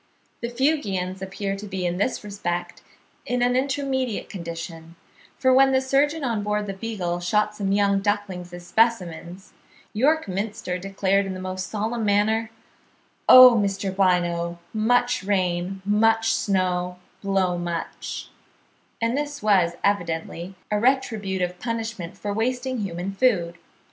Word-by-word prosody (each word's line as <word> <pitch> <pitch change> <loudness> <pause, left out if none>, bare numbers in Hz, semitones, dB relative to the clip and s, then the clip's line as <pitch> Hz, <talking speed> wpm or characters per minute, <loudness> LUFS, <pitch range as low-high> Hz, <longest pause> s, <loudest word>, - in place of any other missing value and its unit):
The 235 - -2
Fuegians 210 -9 -1
appear 195 +1 -3
to 205 +1 -8
be 190 -2 -3
in 175 0 -1
this 215 +5 -1
respect 175 -4 -4 0.4
in 245 0 0
an 245 0 +2
intermediate 265 -3 -1
condition, 165 -2 -7 0.4
for 260 -1 +3
when 270 +1 +5
the 260 - +4
surgeon 280 +4 +1
on 230 -5 0
board 210 0 -1
the 195 - -4
"Beagle" 190 -4 -3
shot 210 +4 +1
some 195 -2 -2
young 200 0 +3
ducklings 195 -3 -2
as 175 0 -9
specimens, 180 -3 0 0.4
York 295 +6 +2
Minster 195 -2 -3
declared 195 +1 0
in 190 - -4
the - - -6
most 185 0 -4
solemn 220 +2 -2
manner, 215 +2 +2 0.8
"Oh, 255 0 +11
Mr. 195 -2 -1
Bynoe, 175 -2 +1 0.2
much 245 +3 +2
rain, 190 -1 -1
much 225 +2 +3
snow, 180 -3 0 0.2
blow 190 -3 +1
much"; 170 -1 -5 0.7
and 230 +2 0
this 290 -2 -3
was 190 -5 +3
evidently 170 -1 -1 0.2
a 210 - +2
retributive 200 -8 0
punishment 225 -6 -4
for 205 0 -3
wasting 250 +3 -1
human 185 -1 -3
food. 190 -7 +1
200 Hz, 135 wpm, -24 LUFS, 180-230 Hz, 0.8 s, Oh